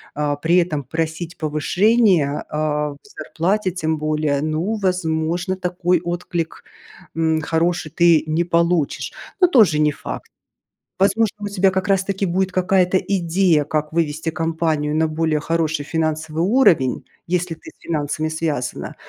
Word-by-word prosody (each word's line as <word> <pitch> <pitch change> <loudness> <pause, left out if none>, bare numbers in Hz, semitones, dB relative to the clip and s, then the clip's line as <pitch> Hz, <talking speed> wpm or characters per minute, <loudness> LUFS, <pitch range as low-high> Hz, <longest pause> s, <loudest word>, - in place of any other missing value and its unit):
а, 145 -1 0
при 165 +4 +2
этом 160 -5 +1
просить 160 +4 -4
повышение, 165 +1 +2
а, 150 -1 -1
в 140 - -12
зарплате 195 0 -2
тем 160 -3 -2
более, 150 -2 0
ну, 155 +8 -1
возможно 180 -1 -1
такой 180 -1 0
отклик, 175 -1 -4 0.5
м, 160 -1 +1
хороший 165 +1 -1
ты 170 -1 +4
не 155 +2 +1
получишь, 170 -2 0 0.3
но 360 - +6
тоже 210 - +4
не 150 0 +3
факт. - - -7 0.7
Возможно, 210 +2 +2
у 205 - -3
тебя 195 -1 +2
как 190 +1 -1
раз 195 -1 +2
таки 195 0 -1
будет 185 +1 0
какая-то 185 0 +2
идея, 175 -4 +1
как 150 +1 -2
вывести 160 0 -1
компанию 160 -2 -1
на 160 0 +2
более 155 -1 0
хороший 160 -1 -1
финансовый 155 0 -2
уровень, 195 - +3 0.2
если 180 -1 -1
ты 160 - -13
с - - -40
финансами 155 -1 -2
связана. 155 -6 -3
165 Hz, 140 wpm, -20 LUFS, 155-180 Hz, 0.7 s, но